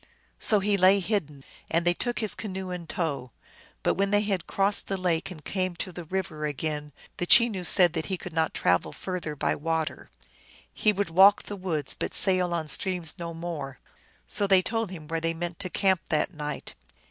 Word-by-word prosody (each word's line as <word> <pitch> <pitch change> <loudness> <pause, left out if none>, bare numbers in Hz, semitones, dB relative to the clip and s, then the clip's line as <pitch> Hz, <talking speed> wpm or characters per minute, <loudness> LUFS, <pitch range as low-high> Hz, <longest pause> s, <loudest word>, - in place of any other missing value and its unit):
So 210 -2 +3
he 200 +1 +1
lay 190 +2 +6
hidden, 160 -9 -2 0.3
and 170 +1 +1
they 175 - +4
took 240 +6 -3
his 215 -3 0
canoe 190 -3 -5
in 175 -2 -6
tow. 155 -9 -3 0.5
But - - +2
when 195 +1 0
they 205 0 +3
had 200 -4 -2
crossed 200 +1 +1
the 195 - -2
lake 175 -2 0
and 155 -5 -11
come 185 -2 -2
to 185 - -4
the 175 -1 -8
river 165 -3 -4
again, 150 0 -3 0.3
the 175 - -3
Chenoo 220 -5 +6
said 175 -1 +6
that 160 -2 -3
he 190 - -2
could 180 -1 -9
not 160 -1 +1
travel 90 0 +1
further 180 -5 -5
by - - 0
water. 160 +1 -3 0.6
He 215 - +2
would 200 -3 -2
walk 195 +4 +6
the 205 - -7
woods, 165 -7 -3
but - - -4
sail 185 -2 +4
on 165 -2 -2
streams 180 -1 -1
no 170 -1 -5
more. 155 -6 -6 0.5
So 200 - +1
they 190 -1 +5
told 225 +2 -1
him 165 -5 -9
where 165 +1 -2
they 165 0 -1
meant 175 0 -5
to 190 -2 -4
camp 190 -1 +1
that 155 +4 0
night. 150 -2 -6
175 Hz, 200 wpm, -27 LUFS, 160-195 Hz, 0.6 s, lay